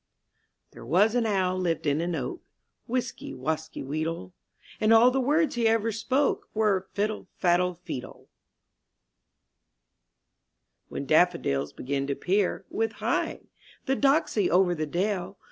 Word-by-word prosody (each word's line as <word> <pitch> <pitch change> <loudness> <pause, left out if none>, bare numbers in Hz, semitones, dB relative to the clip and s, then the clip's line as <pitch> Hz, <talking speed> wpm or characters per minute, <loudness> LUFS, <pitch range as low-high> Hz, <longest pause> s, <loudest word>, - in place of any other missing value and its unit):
^HERE - - -11
was 195 - +4
an 240 -2 +1
owl 185 -3 +1
lived 170 -4 -1
in 145 +1 +1
an 170 0 -1
oak, 360 - -4 0.5
Wisky, 250 - -3
wasky, 155 +5 -3
weedle; 155 - -3 0.5
And 215 +1 +3
all 230 +2 +7
the 265 +1 +1
words 300 +5 +2
he 235 -2 +1
ever 225 0 +2
spoke 255 +6 0
Were, 200 -3 +1
*'Fiddle, 210 0 -2
faddle, 180 0 +2
feedle." 165 -7 -8 2.6
llT'hen 140 - -5
daffodils 155 - +2
begin 135 +1 -3
to 140 - -1
peer, 195 +4 0
^^ - - -39
With 225 0 0
heigh! - - -1 0.4
the 270 - +1
doxy 275 - +2
over 180 0 +4
the 155 -2 -3
dale. 190 +3 -2
190 Hz, 135 wpm, -27 LUFS, 160-225 Hz, 2.6 s, all